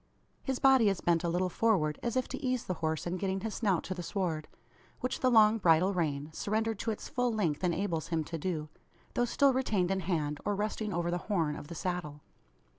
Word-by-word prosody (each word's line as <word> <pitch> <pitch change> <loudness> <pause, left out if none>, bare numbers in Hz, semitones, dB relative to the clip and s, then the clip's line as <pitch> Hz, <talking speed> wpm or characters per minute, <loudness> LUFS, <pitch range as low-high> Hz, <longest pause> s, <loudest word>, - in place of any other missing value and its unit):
His 265 -2 -2
body 265 -5 +5
is 195 - -1
bent 170 0 +1
a 170 - 0
little 180 +2 +1
forward, 180 -7 +1
as 240 +1 -1
if 255 - 0
to - - -6
ease 255 -2 0
the 185 - -1
horse 160 -1 -1
in 175 +1 -2
getting 190 0 -2
his 225 0 -3
snout 195 -7 +1
to 185 - -3
the 180 - -6
sward; 170 -4 -2 0.5
which 255 - -2
the 255 - +3
long 220 -2 +6
bridle 180 +1 +4
rein, 150 -4 -1
surrendered 220 +3 -1
to 230 - -2
its 215 - -4
full 245 -1 0
length, 185 -8 -1
enables 175 -2 0
him 165 -2 0
to 165 +2 -5
do, 155 -2 -2 0.5
though 245 - +2
still 275 +3 +3
retained 210 -8 +1
in 195 - +1
hand, 155 -5 -1
or 205 - 0
resting 210 +1 -2
over 175 -1 -1
the 175 - -1
"horn" 165 -7 +1
of 145 - -8
the 170 - -8
saddle. 165 -4 -4
185 Hz, 220 wpm, -31 LUFS, 165-220 Hz, 0.5 s, long